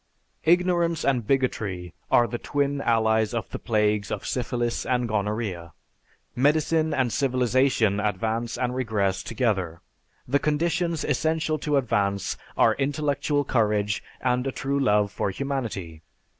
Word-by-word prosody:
"Ignorance 175 -1 +2
and 125 -6 +1
bigotry 100 -10 -1 0.2
are 120 - +5
the 120 0 -4
twin 140 -1 -1
allies 110 -1 +2
of 110 -4 -4
the - - -5
plagues 105 -2 +1
of - - -4
Syphilis 120 -1 -1
and 125 -1 0
Gonorrhea. 105 -5 -2 0.6
Medicine 155 +4 +2
and 130 -5 0
civilization 125 -5 +2
advance 110 +3 -1
and 125 -1 -1
regress 105 -7 0
together. 100 -9 -1 0.5
The 140 +3 +2
conditions 165 +2 0
essential 155 +1 0
to 150 0 +1
advance 100 -6 0 0.2
are - - +5
intellectual 145 +1 0
courage 105 -4 +1 0.2
and 125 +1 0
a - - 0
true 140 +1 -2
love 105 -5 +2
for 100 - -1
humanity. 100 - -4
120 Hz, 130 wpm, -25 LUFS, 105-140 Hz, 0.6 s, are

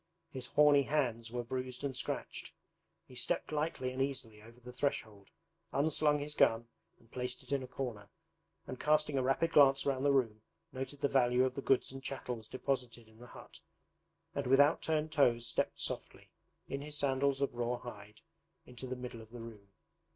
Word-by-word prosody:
His 130 -2 -6
horny 145 +1 +6
hands 125 -5 0
were 120 +1 -3
bruised 130 +1 -4
and 135 -2 -2
scratched. 125 - -4 0.5
He - - -16
stepped 125 - 0
lightly 150 -4 -1
and 130 +1 -3
easily 120 -6 -2
over 115 +3 -15
the 125 0 -11
threshold, 110 -7 -3 0.4
unslung 150 +1 +2
his 145 +1 -5
gun 115 -5 +3 0.3
and 115 - -25
placed 125 0 -3
it - - -11
in 140 -1 +1
a 130 - -6
corner, 110 -8 -5 0.6
and 130 - -7
casting 150 -1 +2
a 135 - +2
rapid 135 +6 +1
glance 140 -2 +6
round 135 -1 0
the 145 - +4
room 115 -6 +1 0.3
noted 135 +2 -5
the 145 - +3
value 125 -2 +3
of 130 - -1
the 140 - -4
goods 135 -1 +2
and 135 0 -8
chattels 125 -4 -5
deposited 125 -3 -3
in 110 0 -20
the 125 - -11
hut, - - -13 0.7
and 140 -2 -2
with 135 +2 +5
out 145 +3 +5
turned 155 -1 0
toes 120 -6 +3
stepped 115 - -1
softly, - - -4 0.4
in 140 - -4
his 150 +1 -4
sandals 140 0 +1
of 140 -2 0
raw 120 0 -1
hide, 105 -3 -10 0.4
into 125 +1 -8
the 130 - -3
middle 125 -2 -7
of 110 - -14
the 120 +1 -9
room. 110 -3 -10
130 Hz, 190 wpm, -34 LUFS, 120-140 Hz, 0.7 s, horny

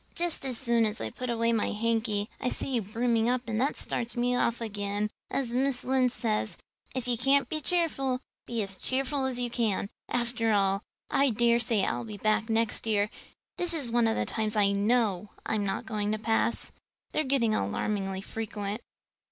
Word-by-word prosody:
"Just 345 -5 -1
as 250 -3 -2
soon 235 -3 +3
as 210 - -3
I 110 -1 -3
put 250 - -5
away 230 0 +2
my 225 - +1
hanky 220 -1 0
I 250 - 0
see - - -1
you 245 -3 +2
brimming 230 +2 +1
up 250 0 +2
and 225 0 0
that 275 +3 +1
starts 240 0 -3
me 245 +1 +2
off 235 -1 +2
again. 205 -1 -2 0.2
As 250 -4 -1
Mrs. 260 0 +1
Lynde 255 -1 +3
says, 215 -6 -1 0.4
'If 255 -1 -2
you 245 - +2
can't 270 +4 +3
be 310 -1 -2
cheerful, 275 -6 +1 0.3
be 230 -3 -1
as 195 -1 -4
cheerful 265 +3 0
as 260 -2 -1
you 245 -1 -1
can.' 215 -4 0 0.2
After 235 -2 +1
all, 195 -1 +2 0.3
I 275 0 +4
dare 235 +1 +3
say 220 -4 +1
I'll - - -1
be 215 -3 -7
back 215 +2 +1
next 225 0 +1
year. 210 -1 +2 0.5
This 350 -1 +3
is 270 -7 0
one 235 -1 +4
of 225 - +2
the - - 0
times 220 -1 -1
I 200 -2 +4
know 205 -1 +2 0.2
I'm 205 -2 0
not 195 - -2
going 210 -2 -1
to - - 0
pass. 225 +1 0 0.4
They're 310 - +1
getting 260 -5 +2
alarmingly 195 - -1
frequent." 210 0 -4
230 Hz, 195 wpm, -29 LUFS, 210-250 Hz, 0.5 s, I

